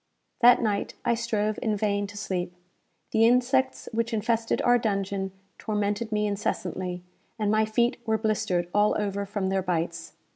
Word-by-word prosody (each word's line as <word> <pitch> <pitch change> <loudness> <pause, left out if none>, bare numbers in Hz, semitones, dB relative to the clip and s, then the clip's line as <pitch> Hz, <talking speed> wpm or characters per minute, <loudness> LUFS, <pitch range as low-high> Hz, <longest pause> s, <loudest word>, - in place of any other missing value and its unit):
That 245 0 +6
night 205 -2 -1
I 235 - +3
strove 215 -2 -1
in 215 -4 0
vain 205 -1 0
to 205 +1 -11
sleep. 180 -3 -3 0.6
The 225 +1 +5
insects 260 +2 +2
which 230 +1 0
infested 225 +1 0
our 245 0 +5
dungeon 195 -3 -1 0.3
tormented 210 +1 -1
me 210 0 +1
incessantly, 185 -3 -3 0.3
and 210 -2 0
my 215 0 +3
feet 235 +3 +1
were 220 0 +2
blistered 195 -5 0
all 210 +1 +3
over 200 -1 -2
from 200 -1 -2
their 190 0 +1
bites. 165 -2 -3
210 Hz, 155 wpm, -26 LUFS, 195-225 Hz, 0.6 s, That